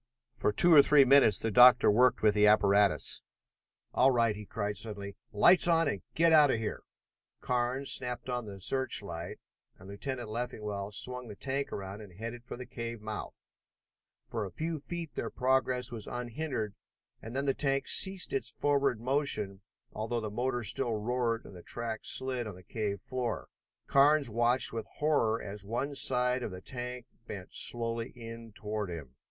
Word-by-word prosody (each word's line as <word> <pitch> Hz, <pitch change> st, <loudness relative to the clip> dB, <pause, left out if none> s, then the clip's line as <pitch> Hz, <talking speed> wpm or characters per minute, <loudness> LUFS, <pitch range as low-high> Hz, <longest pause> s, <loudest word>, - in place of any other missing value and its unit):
For -, -, 0 dB
two 170 Hz, +11 st, +6 dB
or 145 Hz, -, +10 dB
three 140 Hz, -1 st, +5 dB
minutes 135 Hz, -4 st, +6 dB
the 115 Hz, -, -2 dB
doctor 125 Hz, 0 st, +7 dB
worked 125 Hz, +3 st, +3 dB
with 105 Hz, -1 st, +5 dB
his 105 Hz, 0 st, +4 dB
apparatus. 100 Hz, -1 st, +3 dB, 0.7 s
"All 130 Hz, -, +5 dB
right!" 115 Hz, -4 st, +2 dB
he 105 Hz, -1 st, -9 dB
cried 105 Hz, -1 st, -3 dB
suddenly. 100 Hz, -1 st, -6 dB, 0.2 s
"Lights 170 Hz, -, +6 dB
on 165 Hz, -2 st, +3 dB
and 100 Hz, -, -2 dB
get 165 Hz, 0 st, +4 dB
out 150 Hz, -2 st, +7 dB
of 115 Hz, -, +1 dB
here!" 110 Hz, -1 st, -4 dB, 0.6 s
Carnes 125 Hz, +2 st, -1 dB
snapped 125 Hz, -1 st, -3 dB
on 125 Hz, -2 st, -3 dB
the 100 Hz, -1 st, -9 dB
search 130 Hz, +2 st, -1 dB
light 85 Hz, -2 st, -7 dB, 0.4 s
and 95 Hz, -, -14 dB
Lieutenant 120 Hz, +4 st, -5 dB
Leffingwell 105 Hz, -3 st, -4 dB
swung 125 Hz, +4 st, -2 dB
the 105 Hz, -, -9 dB
tank 135 Hz, +5 st, -3 dB
around 100 Hz, +1 st, -6 dB
and 95 Hz, -4 st, -13 dB
headed 115 Hz, +2 st, -7 dB
for 120 Hz, -, -8 dB
the 125 Hz, -, -8 dB
cave 115 Hz, -1 st, -6 dB
mouth. 105 Hz, 0 st, -7 dB, 0.8 s
For 115 Hz, -2 st, -4 dB
a 95 Hz, -, -6 dB
few 160 Hz, -, -4 dB
feet 165 Hz, +1 st, -7 dB
their -, -, -4 dB
progress 130 Hz, -1 st, 0 dB
was 115 Hz, -3 st, -6 dB
unhindered 120 Hz, -2 st, -4 dB, 0.5 s
and 115 Hz, +3 st, -9 dB
then 140 Hz, +1 st, 0 dB
the 135 Hz, -, +2 dB
tank 135 Hz, -1 st, -1 dB
ceased 190 Hz, -, +5 dB
its 405 Hz, -, -2 dB
forward 140 Hz, -4 st, 0 dB
motion, 115 Hz, -7 st, -1 dB, 0.3 s
although 115 Hz, +2 st, -2 dB
the 110 Hz, -2 st, -5 dB
motor 125 Hz, +2 st, -2 dB
still 120 Hz, +3 st, 0 dB
roared 115 Hz, +1 st, -1 dB
and 95 Hz, -, -12 dB
the 90 Hz, -, -10 dB
track 115 Hz, +2 st, -4 dB
slid 130 Hz, -3 st, -2 dB
on 105 Hz, -, -7 dB
the 90 Hz, -, -15 dB
cave 100 Hz, -2 st, -4 dB
floor. 125 Hz, 0 st, -4 dB, 0.4 s
Carnes 140 Hz, -2 st, +4 dB
watched 120 Hz, +3 st, +2 dB
with 115 Hz, -1 st, -5 dB
horror 145 Hz, -7 st, +1 dB
as 105 Hz, -2 st, -7 dB
one 120 Hz, +8 st, -3 dB
side 125 Hz, -2 st, +1 dB
of -, -, -3 dB
the 90 Hz, -1 st, -8 dB
tank 125 Hz, +3 st, -6 dB, 0.2 s
bent 95 Hz, -2 st, -8 dB
slowly 115 Hz, 0 st, 0 dB
in 115 Hz, -1 st, -10 dB
toward 105 Hz, -1 st, -4 dB
him. 75 Hz, -7 st, -8 dB
120 Hz, 175 wpm, -30 LUFS, 105-130 Hz, 0.8 s, or